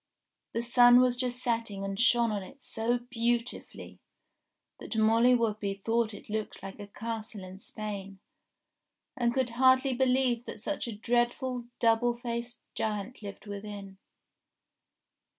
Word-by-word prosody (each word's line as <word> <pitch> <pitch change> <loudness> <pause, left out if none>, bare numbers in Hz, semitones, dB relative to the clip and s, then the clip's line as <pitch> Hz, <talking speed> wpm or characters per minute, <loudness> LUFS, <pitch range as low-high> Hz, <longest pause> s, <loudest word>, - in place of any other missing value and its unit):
The 230 - -1
sun 245 0 +7
was 250 -1 +4
just 250 0 -1
setting 230 -5 -2
and 195 0 -3
shone 235 -2 +4
on 205 -1 -2
it 260 +8 -13
so 230 +2 0
beautifully, 240 0 -3 0.8
that 225 - -5
Molly 225 +3 +5
Whuppie 215 -4 0
thought 225 +1 0
it - - -12
looked 215 -2 -4
like 195 +2 -8
a 205 - -7
castle 220 -1 -6
in 185 +1 -10
Spain, 200 -2 -6 1.0
and 240 -1 +1
could 255 -1 0
hardly 260 +2 +4
believe 250 -1 +2
that - - -7
such 280 +4 -2
a 230 - -5
dreadful, 240 +2 0
double 235 +1 +3
faced 240 0 -5
giant 215 +3 -3
lived 200 0 -8
within. 200 -1 -7
230 Hz, 135 wpm, -30 LUFS, 210-245 Hz, 1.0 s, sun